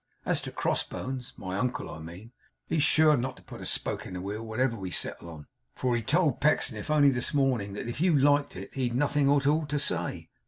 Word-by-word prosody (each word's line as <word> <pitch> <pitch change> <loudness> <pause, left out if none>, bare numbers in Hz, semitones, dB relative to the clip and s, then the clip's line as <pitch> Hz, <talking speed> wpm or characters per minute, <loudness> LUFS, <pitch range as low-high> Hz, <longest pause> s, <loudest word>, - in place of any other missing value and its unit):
As - - +1
to - - -6
crossbones 130 -1 -3
(my 95 +1 -4
uncle, 125 +1 -1
I - - -8
mean), 85 +8 -10 0.3
he's 160 - 0
sure 155 0 +5
not 130 0 -3
to - - -16
put - - -10
a - - -5
spoke - - -2
in - - -8
the 90 - -4
wheel, 100 +3 -4
whatever 115 +2 0
we 95 -4 -5
settle 85 -1 -3
on, 75 -3 -10 0.3
for 125 -2 0
he 120 - 0
told 145 +3 +1
Pecksniff 125 -7 +1
only 145 -2 +5
this 125 +3 -2
morning, 125 -8 +1
that 105 - -5
if 120 +5 -3
YOU 175 -3 +4
liked 145 +1 +3
it 95 +2 -8
he'd 125 -3 -1
nothing 145 +1 +2
at 140 -1 +3
all 150 +1 +2
to 145 0 -1
say. - - -3
130 Hz, 225 wpm, -28 LUFS, 105-145 Hz, 0.3 s, sure